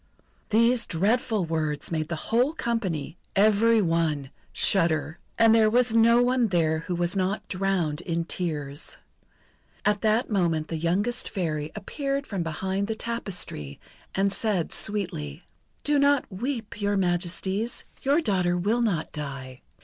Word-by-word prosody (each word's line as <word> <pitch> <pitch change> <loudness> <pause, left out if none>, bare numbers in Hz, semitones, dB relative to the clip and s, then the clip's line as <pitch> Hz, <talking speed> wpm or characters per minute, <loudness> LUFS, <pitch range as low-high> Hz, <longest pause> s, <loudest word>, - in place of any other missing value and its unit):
These 230 +2 +3
dreadful 215 +3 +1
words 155 -2 -2
made 155 -2 -1
the 170 - -3
whole 245 - +1
company 185 - -2 0.2
every 215 +2 +4
one 160 -5 0 0.2
shudder; 160 -4 +1 0.2
and 225 -1 +6
there 220 -1 +5
was 245 0 +3
no 230 +1 +5
one 250 -1 +2
there 160 -4 +1
who 175 +2 -3
was 175 +2 -1
not 190 +2 -1
drowned 185 -5 0
in 170 -1 -2
tears. 150 -4 -3 0.9
At 210 -1 +2
that 220 +3 +2
moment 165 -6 +1
the 165 - -2
youngest 200 +10 0
Fairy 155 -5 -2
appeared 275 +6 -3
from 195 -4 -3
behind 190 +5 -2
the 220 - -2
tapestry, 190 - -4 0.4
and 195 0 +2
said 200 -7 -1
sweetly: 175 - -2 0.4
"Do 290 -1 +2
not 280 -1 +4
weep, 230 0 -4
Your 205 0 +1
Majesties, 190 +4 -1 0.2
your 285 +5 +3
daughter 180 - +1
will 215 +7 +1
not 185 -9 0
die. 135 -4 -6
195 Hz, 140 wpm, -26 LUFS, 165-225 Hz, 0.9 s, and